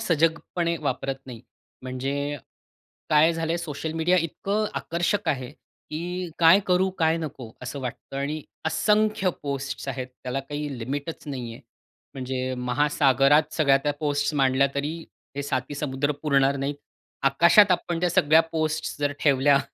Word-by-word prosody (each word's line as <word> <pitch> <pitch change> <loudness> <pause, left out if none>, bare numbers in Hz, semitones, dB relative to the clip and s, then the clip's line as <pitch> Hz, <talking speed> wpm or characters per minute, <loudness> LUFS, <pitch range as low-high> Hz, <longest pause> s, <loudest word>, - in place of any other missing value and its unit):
सजगपणे 170 -2 0
वापरत 135 -1 -2
नाही. 120 -3 -9 0.4
म्हणजे 140 +3 -3 0.7
काय 155 +2 +5
झालं 165 0 -2
आहे, 170 - -1
सोशल 160 -1 -4
मीडिया 165 +3 +2
इतकं 200 +6 -1
आकर्षक 175 +4 -1
आहे, 130 -4 -1 0.4
की 175 +2 -4
काय 170 +4 +7
करू, 185 +1 +3
काय 160 0 +3
नको 135 -8 -7
असं 135 +2 -5
वाटतं 130 +2 -6
आणि 145 +2 -2 0.2
असंख्य 210 +4 +2
पोस्ट्स 140 -1 -4
आहेत. 130 -1 -3 0.2
त्याला 130 +2 -2
काही 145 -1 -5
लिमिटच 140 +7 -5
नाही 125 -5 -5
आहे. - - -11 0.5
म्हणजे 130 0 -3
महासागरात 140 +3 +3
सगळ्या 140 -4 +4
त्या 145 -1 +1
पोस्ट्स 145 0 0
मांडल्या, 135 0 +3
तरी 150 +4 -2 0.4
हे 140 - -2
7ही 130 0 -2
समुद्र 145 0 -1
पुरणार 140 -2 +3
नाहीत. 140 +1 -2 0.5
आकाशात 170 +8 +6
आपण 175 -1 -1
त्या 180 - +2
सगळ्या 155 +2 +5
पोस्ट्स 155 -1 -1
जर 145 0 0
ठेवल्या, 140 -1 +4
145 Hz, 145 wpm, -25 LUFS, 135-165 Hz, 0.7 s, काय